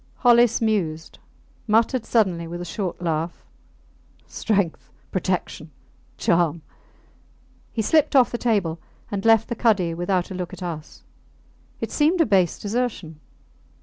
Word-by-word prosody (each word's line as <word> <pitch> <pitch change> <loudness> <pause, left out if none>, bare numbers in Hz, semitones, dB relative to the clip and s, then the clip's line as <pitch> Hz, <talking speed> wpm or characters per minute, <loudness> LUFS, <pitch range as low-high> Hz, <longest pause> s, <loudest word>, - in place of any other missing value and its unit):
Hollis 240 -2 +4
mused, 170 -8 -1 0.5
muttered 225 +3 +2
suddenly 185 -7 +1
with 175 +1 -6
a 175 - -5
short 190 -2 -4
laugh, 165 0 -2 0.8
Strength... 200 -6 -1 0.2
Protection... 180 -4 -2 0.5
Charm. 170 -2 +1 1.1
He 220 - -2
slipped 305 +5 +2
off 255 -3 +5
the 240 - -3
table 195 -9 0 0.3
and 200 -1 -3
left 225 -1 +5
the 235 - -3
cuddy 205 -8 +2
without 175 +2 -1
a - - -4
look 180 -2 -5
at - - -8
us. 160 -3 -7 0.8
It - - -3
seemed 315 +4 +2
a 325 - +5
base 185 -5 +2
desertion. 205 -8 -3
195 Hz, 130 wpm, -23 LUFS, 170-230 Hz, 1.1 s, off